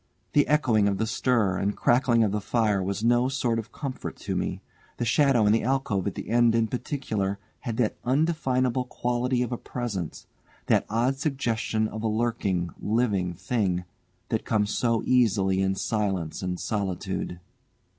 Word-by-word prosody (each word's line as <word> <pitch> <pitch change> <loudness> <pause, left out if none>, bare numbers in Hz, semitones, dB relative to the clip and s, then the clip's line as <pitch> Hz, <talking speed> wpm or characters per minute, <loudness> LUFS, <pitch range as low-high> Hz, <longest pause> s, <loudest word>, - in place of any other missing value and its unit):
The 145 - +4
echoing 120 -9 +3
of 100 -1 0
the 110 - 0
stir 110 -4 +1
and 100 +1 -1
crackling 120 -1 +3
of 105 - +1
the 105 0 -1
fire 105 -2 +1
was 100 +3 -2
no 120 +2 +3
sort 125 -4 0
of 110 - -7
comfort 135 -3 -5
to - - -4
me. - - -2 0.4
The 120 - -1
shadow 130 -2 +4
in 105 - +5
the 115 - +3
alcove 120 -7 0
at 100 - -3
the - - -6
end 120 -1 +4
in 115 -1 +2
particular, 110 -7 -2 0.2
had 115 -4 -4
that 120 -4 +1
undefinable 130 -3 +1
quality 125 +1 0
of 125 - -4
a 120 - -3
presence, 105 -10 -5 0.4
that - - +2
odd 120 +5 +1
suggestion 115 -6 0
of 110 0 -6
a 115 - 0
lurking, 105 -6 0
living 105 -6 0
thing, 95 -2 -1 0.5
that - - 0
comes 105 -1 +1
so 115 -2 +1
easily 100 -6 +3
in 95 0 +1
silence 95 -6 -1
and 90 -1 -3
solitude. 95 -3 -3
115 Hz, 165 wpm, -26 LUFS, 100-125 Hz, 0.5 s, in